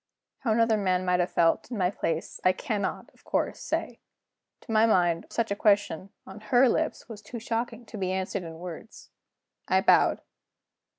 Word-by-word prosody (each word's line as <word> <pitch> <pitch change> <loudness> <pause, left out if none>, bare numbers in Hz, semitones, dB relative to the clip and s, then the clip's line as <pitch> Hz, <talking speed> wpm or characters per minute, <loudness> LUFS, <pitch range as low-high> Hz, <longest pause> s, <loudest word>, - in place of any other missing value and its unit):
How 235 - -1
another 225 0 +3
man 185 -2 0
might 180 0 +2
have 175 - +1
felt, 165 +5 +2
in 240 - -4
my 180 -2 +1
place, 165 -4 -3
I 185 - +5
cannot, 205 0 -3
of - - -26
course, - - -1
say. - - -3 0.6
To 230 - -9
my 220 +1 +5
mind, 175 -5 +2
such 230 -3 -1
a - - +1
question 200 -3 +1 0.2
on 195 +2 -10
her 245 +4 +4
lips - - -1
was 220 -3 -9
too 215 +3 -8
shocking 230 +1 -3
to 215 -1 -9
be 185 -1 -1
answered 190 +1 -2
in 165 -2 -8
words. 175 +5 -10 0.6
I - - +3
bowed. - - +4
200 Hz, 180 wpm, -27 LUFS, 180-225 Hz, 0.6 s, I